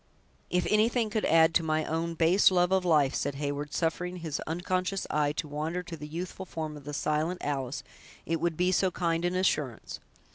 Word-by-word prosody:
"If 180 0 +1
anything 220 +1 +2
could 215 0 0
add 160 +1 +5
to - - +4
my 155 -1 0
own 165 +1 -2
base 170 +5 +5
love 180 -1 +2
of 190 -1 +3
life," 150 -6 +3
said 145 0 -2
Heyward, 145 +1 -3
suffering 180 +3 -1
his 160 -4 -4
unconscious 185 +3 -1
eyes 150 -1 +1
to 155 - -2
wander 155 +5 -3
to 175 -2 -7
the 150 -1 -8
youthful 180 +4 -6
form 155 -2 -5
of 145 -2 -11
the 150 - -5
silent 155 +5 -1
Alice, 135 -1 -2 0.4
"it 165 0 -1
would 170 -2 0
be 180 +1 +2
so 185 +1 +3
kind 170 -2 -1
an 175 +1 0
assurance. 150 -10 -1
165 Hz, 195 wpm, -29 LUFS, 150-180 Hz, 0.4 s, add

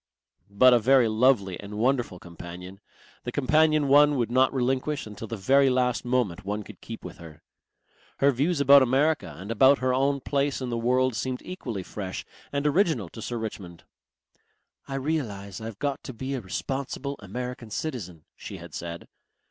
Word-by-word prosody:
But 125 +6 +6
a 120 - +5
very 130 +1 +4
lovely 110 -5 +2
and 105 +1 -8
wonderful 120 -4 0
companion, 90 +2 -10 0.4
the 120 - -4
companion 155 +2 +3
one 145 +1 +6
would 120 -3 -1
not 130 +1 +4
relinquish 135 +3 -1
until 105 +1 -8
the 115 - -5
very 135 +7 +4
last 125 -1 +1
moment 120 -7 0
one 105 +2 -3
could - - -13
keep - - -9
with - - -8
her. 80 -3 -13 0.7
Her 140 +1 +4
views 145 +6 0
about 140 0 +7
America 140 +5 +1
and 95 +6 -7
about 130 +5 +5
her 130 0 0
own 140 +2 +1
place 140 +1 -1
in 130 -2 -4
the - - -1
world 130 +2 +2
seemed 130 +1 -3
equally 120 - -5
fresh 95 0 -6 0.3
and 140 0 -2
original 150 - +2
to 115 - -10
Sir 120 +2 -4
Richmond. 100 -6 -7 1.0
"I 135 - -5
realize 115 -10 -3
I've 110 -2 -7
got 140 +1 -2
to 130 - -6
be 130 +4 -5
a 130 - -3
responsible 135 +7 -4
American 125 +3 -6
citizen," 105 - -5
she - - -8
had - - -12
said. 85 0 -6
125 Hz, 170 wpm, -26 LUFS, 105-140 Hz, 1.0 s, about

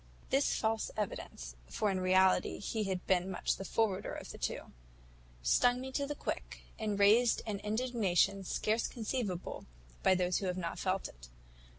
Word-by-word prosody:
"This 275 +1 +3
false 220 0 0
evidence 125 - -4
(for 210 - 0
in 190 - -1
reality 185 0 +3
he 215 +1 -2
had 185 -2 -2
been 185 0 +2
much 190 - -1
the - - -5
forwarder 200 -1 0
of - - -7
the - - -10
two) - - -3 0.7
stung 245 - +4
me 265 +1 -5
to 280 +1 -1
the 295 - -3
quick, - - -5 0.2
and 210 -2 -1
raised 220 +4 +5
an 205 -2 -3
indignation 210 -4 +1
scarce 215 +4 0
conceivable 220 -6 -3 0.3
by 190 - +5
those 180 -1 +1
who 195 - -2
have 180 0 -1
not 170 -2 -3
felt 190 0 0
it. - - -14
200 Hz, 170 wpm, -33 LUFS, 185-225 Hz, 0.7 s, raised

